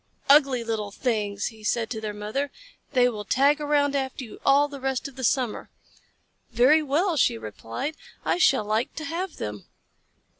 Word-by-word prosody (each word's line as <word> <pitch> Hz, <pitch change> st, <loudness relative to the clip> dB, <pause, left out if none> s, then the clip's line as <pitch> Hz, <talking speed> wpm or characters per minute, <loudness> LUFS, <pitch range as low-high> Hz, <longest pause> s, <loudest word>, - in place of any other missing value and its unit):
"Ugly 275 Hz, -4 st, +5 dB
little 220 Hz, -2 st, -2 dB
things!" 205 Hz, -2 st, -2 dB
he 220 Hz, -1 st, -16 dB
said 225 Hz, +1 st, -1 dB
to 220 Hz, -3 st, -4 dB
their 215 Hz, -1 st, -3 dB
mother. 215 Hz, +8 st, -3 dB, 0.4 s
"They 250 Hz, -2 st, +5 dB
will 215 Hz, -4 st, -3 dB
tag 280 Hz, +7 st, +3 dB
around 290 Hz, -1 st, +2 dB
after 265 Hz, -1 st, -2 dB
you 225 Hz, -, -11 dB
all 280 Hz, +1 st, +5 dB
the 285 Hz, -1 st, -9 dB
rest 265 Hz, +1 st, -2 dB
of 275 Hz, -, -13 dB
the 260 Hz, -, -7 dB
summer." 250 Hz, -2 st, 0 dB, 0.8 s
"Very 255 Hz, +7 st, +5 dB
well," 315 Hz, +4 st, +1 dB
she 115 Hz, -, +3 dB
replied. 115 Hz, -, -5 dB, 0.3 s
"I -, -, +1 dB
shall 265 Hz, -10 st, +4 dB
like 215 Hz, +3 st, -1 dB
to 315 Hz, -, -5 dB
have 335 Hz, +2 st, -4 dB
them." 105 Hz, -1 st, -6 dB
255 Hz, 175 wpm, -25 LUFS, 215-285 Hz, 0.8 s, Ugly